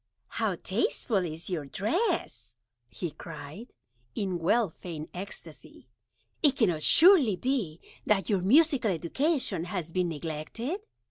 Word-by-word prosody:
"How - - -1
tasteful 255 - -1
is 165 -1 -6
your 160 -5 -2
Dress," 210 - -2 0.3
he 175 +4 -5
cried, 155 - -10 0.4
in 185 -4 -2
well 215 +7 +2
feigned 160 -2 -8
Ecstacy; 195 +3 -10 0.5
"it 290 -4 +4
cannot 180 - +1
surely 320 - +7
be 210 - -2 0.3
that 200 -2 +2
your 200 -5 +1
Musical 275 - +4
Education 190 - 0
has 175 -3 -5
been 180 0 0
neglected? 165 - -5
190 Hz, 120 wpm, -28 LUFS, 165-250 Hz, 0.5 s, surely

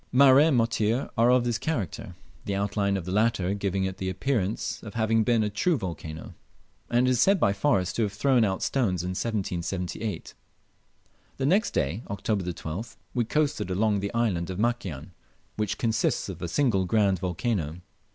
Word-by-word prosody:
Mareh 135 +3 +7
and 145 -6 +3
Motir 115 +1 +1
are 115 +1 +4
of 125 -1 +4
this 120 -1 -1
character, 130 - -3 0.3
the 100 - -2
outline 100 0 0
of 90 - -5
the 90 - -4
latter 105 -2 +1
giving 100 -1 -1
it 95 -1 -3
the 95 - -3
appearance 105 0 -1
of 110 -1 -10
having 110 0 +2
been 115 -1 +2
a 105 - 0
true 160 - +1
volcano, 80 - -6 0.6
and 120 +1 +3
it - - +3
is 125 - +2
said 195 0 +4
by 100 -8 +3
Forrest 100 -5 +1
to - - +1
have 105 -3 +1
thrown 125 +2 +3
out 95 -3 0
stones 95 -10 0
in 90 - -3
1778. 95 0 -3 1.0
The 135 - -1
next 195 +10 +2
day 80 +10 0
(Oct. 100 - -4
12th), 95 0 -3 0.2
we 120 -2 +1
coasted 150 - 0
along 100 +2 +1
the 100 +1 -3
island 95 -8 0
of 90 - -4
Makian, 95 - -2 0.4
which 105 -2 -2
consists 110 -2 0
of - - -7
a 85 - -2
single 95 - +1
grand 100 -2 +2
volcano. 90 -3 -2
105 Hz, 180 wpm, -27 LUFS, 95-120 Hz, 1.0 s, Mareh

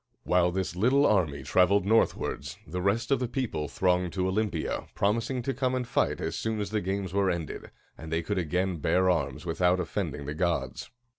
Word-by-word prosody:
While 90 -1 +3
this 95 -1 -2
little 130 +9 +4
army 80 - +2
traveled 90 +7 +3
northwards, 110 +3 +1
the 90 +4 -4
rest 110 +6 0
of 135 - +4
the 125 - -1
people 115 - -2
thronged 90 +2 +1
to 95 -1 0
Olympia, 95 -4 -1
promising 115 +5 0
to 135 - -1
come 130 0 0
and 125 -2 -2
fight - - +1
as - - -3
soon 110 -1 -2
as 105 -1 -3
the 110 -1 0
games 95 0 -3
were 100 -1 +2
ended, 85 -4 -4 0.3
and 80 0 -8
they 80 +1 0
could 100 +3 -1
again 90 +2 0
bear 90 +4 +3
arms 90 +1 -2
without 90 +2 +2
offending 80 -5 -3
the 75 - -3
gods. 85 +1 -2
95 Hz, 195 wpm, -28 LUFS, 85-110 Hz, 0.3 s, little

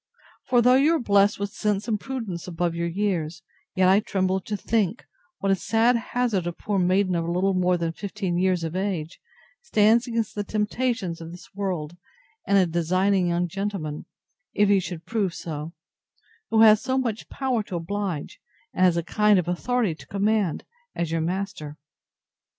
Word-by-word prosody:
For, 245 -2 +4
though 250 +1 +6
you 300 +5 +4
are - - 0
blessed 200 -3 +3
with 200 0 -3
sense 210 0 -1
and 215 -3 0
prudence 220 -10 -5
above 175 -1 -1
your 170 0 -2
years, 170 -3 -2 0.3
yet 185 0 +4
I 190 +2 +6
tremble 190 -2 0
to 210 +2 -4
think, 215 0 -1 0.3
what 195 - 0
a - - +4
sad 225 +6 +2
hazard 235 -6 -1
a 175 - -2
poor 205 +2 -2
maiden 185 +1 +2
of 170 -1 -1
little 185 +3 +1
more 180 -1 +2
than 165 -1 -1
fifteen 195 0 -4
years 185 -2 +1
of 165 +1 -4
age 185 -4 -3 0.4
stands 230 - +3
against 230 -2 -2
the 205 - -3
temptations 210 -3 -2
of 165 - -7
this 175 +1 -12
world, 180 -5 -3 0.5
and 200 - +4
a 190 - +5
designing 180 +3 +1
young 175 +1 0
gentleman, 185 -5 -4 0.5
if 205 -1 +3
he 200 -1 +5
should 175 -3 -6
prove 205 -6 -1
so, 155 -1 -6 0.8
who 220 0 +4
has 215 -1 +7
so 260 0 -1
much 230 -4 -2
power 260 -4 -1
to 200 -3 -7
oblige, 175 -2 -4 0.3
and 185 - +1
has 180 -2 +4
a 170 - 0
kind 210 +3 +3
of 180 - 0
authority 215 +2 0
to 155 - -14
command, 200 -3 0 0.3
as 170 -2 -2
your 165 0 0
master. 180 -3 -4
195 Hz, 180 wpm, -25 LUFS, 175-210 Hz, 0.8 s, has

